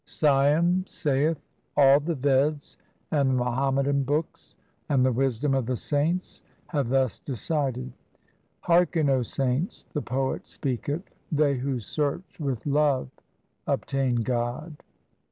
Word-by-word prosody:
Siam 155 Hz, +5 st, +3 dB
saith, 150 Hz, +2 st, 0 dB, 0.4 s
all 140 Hz, 0 st, +7 dB
the 160 Hz, +3 st, -2 dB
Veds 140 Hz, +2 st, +1 dB, 0.4 s
and 140 Hz, -3 st, +2 dB
the -, -, +2 dB
Muhammadan 135 Hz, +3 st, +1 dB
books 145 Hz, +4 st, -3 dB, 0.3 s
and 130 Hz, -3 st, +3 dB
the 130 Hz, -, +3 dB
wisdom 135 Hz, +2 st, 0 dB
of 130 Hz, -3 st, 0 dB
the 125 Hz, -1 st, -1 dB
saints 160 Hz, +8 st, -1 dB, 0.2 s
have 140 Hz, -7 st, -1 dB
thus 130 Hz, -2 st, +1 dB
decided. 130 Hz, -1 st, -2 dB, 0.7 s
Hearken, 170 Hz, -3 st, +3 dB
O 130 Hz, -1 st, +3 dB
saints, 130 Hz, -, -2 dB
the 150 Hz, -, -1 dB
poet 130 Hz, +1 st, -2 dB
speaketh, 145 Hz, +5 st, -3 dB, 0.3 s
they 150 Hz, -2 st, +3 dB
who 130 Hz, 0 st, -2 dB
search 145 Hz, -, -3 dB
with 135 Hz, -7 st, -3 dB
love 145 Hz, -3 st, +2 dB, 0.6 s
obtain 135 Hz, -3 st, 0 dB
God. 125 Hz, +6 st, -2 dB
140 Hz, 120 wpm, -26 LUFS, 130-150 Hz, 0.7 s, all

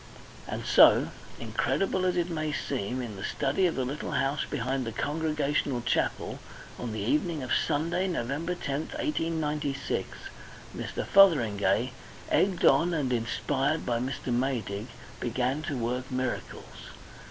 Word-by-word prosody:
And -, -, -4 dB
so, -, -, +6 dB, 0.3 s
incredible 190 Hz, -1 st, 0 dB
as 180 Hz, -1 st, +1 dB
it 175 Hz, 0 st, 0 dB
may 155 Hz, -2 st, -1 dB
seem, 130 Hz, -3 st, -2 dB
in 110 Hz, -4 st, -6 dB
the 95 Hz, -, -6 dB
study 180 Hz, +7 st, +1 dB
of 170 Hz, -, -2 dB
the 130 Hz, -, -1 dB
little 140 Hz, +4 st, -4 dB
house 135 Hz, +1 st, 0 dB
behind 130 Hz, +3 st, -1 dB
the 115 Hz, -, -4 dB
Congregational 145 Hz, -1 st, -1 dB
Chapel, -, -, -1 dB, 0.4 s
on 120 Hz, -2 st, -4 dB
the 110 Hz, -, -4 dB
evening 150 Hz, -, 0 dB
of 125 Hz, -, -5 dB
Sunday, 170 Hz, +5 st, +1 dB
Nov. 165 Hz, -10 st, -1 dB
10, 140 Hz, +3 st, -1 dB
1896, 150 Hz, -, -2 dB, 0.6 s
Mr. -, -, -4 dB
Fotheringay, 120 Hz, -, +4 dB, 0.4 s
egged 190 Hz, -3 st, +2 dB
on 170 Hz, 0 st, +5 dB
and 135 Hz, -5 st, 0 dB
inspired 135 Hz, +6 st, 0 dB
by 120 Hz, -1 st, 0 dB
Mr. 130 Hz, 0 st, -3 dB
Maydig, 120 Hz, -4 st, -1 dB, 0.3 s
began 125 Hz, +4 st, -1 dB
to 145 Hz, -3 st, -3 dB
work 125 Hz, +2 st, -2 dB
miracles. 130 Hz, -1 st, -4 dB
135 Hz, 135 wpm, -28 LUFS, 125-160 Hz, 0.6 s, so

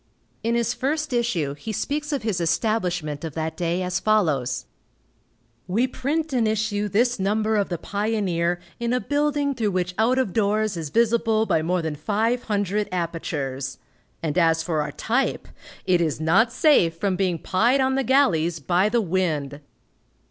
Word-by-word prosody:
In 230 Hz, +1 st, +1 dB
his 235 Hz, -2 st, +1 dB
first 295 Hz, +1 st, -2 dB
issue 200 Hz, -, 0 dB
he 145 Hz, +10 st, -6 dB
speaks 295 Hz, +7 st, -2 dB
of 280 Hz, -6 st, -2 dB
his 205 Hz, -6 st, -1 dB
establishment 175 Hz, -4 st, -1 dB
of 160 Hz, -3 st, -5 dB
that 160 Hz, 0 st, -3 dB
day, 175 Hz, +1 st, -1 dB
as 180 Hz, 0 st, -1 dB
follows: 140 Hz, -, +1 dB, 1.0 s
"We 220 Hz, +8 st, +2 dB
print 285 Hz, +4 st, -2 dB
and 235 Hz, -3 st, +2 dB
issue 210 Hz, -1 st, -1 dB
this 240 Hz, +3 st, +2 dB
number 215 Hz, +3 st, +1 dB
of 205 Hz, -2 st, +1 dB
the 175 Hz, -, -2 dB
Pioneer 195 Hz, -4 st, -1 dB, 0.2 s
in 235 Hz, 0 st, -1 dB
a 250 Hz, -, +2 dB
building 290 Hz, 0 st, 0 dB
through 225 Hz, -5 st, -1 dB
which 180 Hz, -2 st, -1 dB
out 240 Hz, +4 st, +3 dB
of 255 Hz, -9 st, 0 dB
doors 215 Hz, -1 st, +1 dB
is 160 Hz, -3 st, -4 dB
visible 225 Hz, +1 st, +2 dB
by 160 Hz, -, +1 dB
more 175 Hz, +2 st, 0 dB
than 160 Hz, -1 st, -2 dB
five 220 Hz, +9 st, 0 dB
hundred 205 Hz, -1 st, -1 dB
apertures; 145 Hz, -6 st, -3 dB, 0.5 s
and 155 Hz, +1 st, 0 dB
as 165 Hz, -1 st, +3 dB
for 160 Hz, -3 st, 0 dB
our 150 Hz, -, -3 dB
type, 250 Hz, +4 st, -1 dB, 0.4 s
it 180 Hz, -2 st, +3 dB
is 155 Hz, -4 st, -1 dB
not 185 Hz, +9 st, +3 dB
safe 235 Hz, -, +3 dB
from 195 Hz, +1 st, 0 dB
being 180 Hz, -3 st, 0 dB
pied 235 Hz, +11 st, +2 dB
on 265 Hz, 0 st, +2 dB
the 270 Hz, 0 st, +1 dB
galleys 175 Hz, -, +2 dB
by 180 Hz, +7 st, +2 dB
the 235 Hz, +1 st, +2 dB
wind." 160 Hz, -7 st, -1 dB
200 Hz, 170 wpm, -24 LUFS, 165-235 Hz, 1.0 s, out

